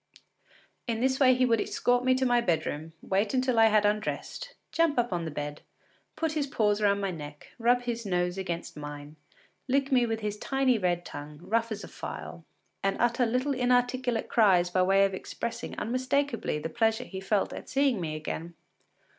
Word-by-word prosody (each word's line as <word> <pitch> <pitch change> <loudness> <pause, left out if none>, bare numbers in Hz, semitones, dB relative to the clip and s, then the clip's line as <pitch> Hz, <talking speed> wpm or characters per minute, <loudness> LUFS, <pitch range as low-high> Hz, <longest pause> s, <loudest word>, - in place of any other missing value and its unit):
In 230 -2 -1
this 260 +2 +1
way 255 -2 +6
he 255 0 +3
would 230 -3 +2
escort 245 0 +1
me 255 0 +4
to 260 0 +1
my 245 -1 +3
bedroom, 160 -5 -2
wait 205 +5 0
until 255 -2 +2
I 225 - +7
had 215 -1 +3
undressed, 215 - -2 0.2
jump 330 -4 +2
up 240 -4 +1
on 170 -1 -2
the - - -3
bed, 145 0 -5 0.5
put 320 -1 -1
his 300 -2 -1
paws 210 -5 +1
round 200 -1 +3
my 195 -1 -1
neck, 150 -3 -9
rub 245 +1 +3
his 235 -1 -3
nose 180 -3 0
against 175 -3 -4
mine, 145 0 -8 0.5
lick 275 +1 +1
me 250 -2 +4
with 225 0 -2
his 210 0 -3
tiny 265 -2 +1
red 175 -2 0
tongue, 145 +1 -8
rough 230 +4 0
as 215 -1 -4
a - - -7
file, - - -7 0.4
and 195 0 0
utter 240 +1 +2
little 255 +5 0
inarticulate 250 -1 +1
cries 185 -6 +4
by 185 - +2
way 195 +2 +5
of 195 - -2
expressing 230 +4 -5
unmistakably 255 - -1
the 150 +2 -3
pleasure 225 +4 +1
he 190 -5 -7
felt 195 +1 0
at - - -8
seeing 270 -7 +2
me 155 -2 -3
again. 160 +2 -5
225 Hz, 190 wpm, -28 LUFS, 180-250 Hz, 0.5 s, I